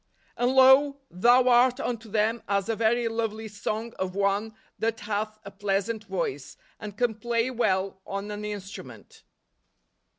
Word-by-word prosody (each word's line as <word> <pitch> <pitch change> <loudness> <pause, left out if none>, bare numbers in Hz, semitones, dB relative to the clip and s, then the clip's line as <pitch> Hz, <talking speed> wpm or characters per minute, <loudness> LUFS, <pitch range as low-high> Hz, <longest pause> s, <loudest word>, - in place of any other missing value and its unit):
"And, 245 +2 +1
lo, 265 +2 +6
thou 245 +7 +4
art 250 +1 +5
unto 230 -4 -4
them 220 +2 +1
as 200 -1 +1
a 225 - +1
very 230 +2 +1
lovely 225 -1 -3
song 215 +2 -4
of 185 0 -3
one 200 +2 0 0.2
that 225 0 -1
hath 215 +1 -3
a 200 - -8
pleasant 205 +2 -2
voice, 170 -8 -4 0.2
and 210 -1 -8
can 245 -1 +1
play 235 +2 -1
well 190 -5 0
on 200 +1 -4
an 210 0 -6
instrument 205 -2 -8
220 Hz, 145 wpm, -26 LUFS, 200-235 Hz, 0.2 s, lo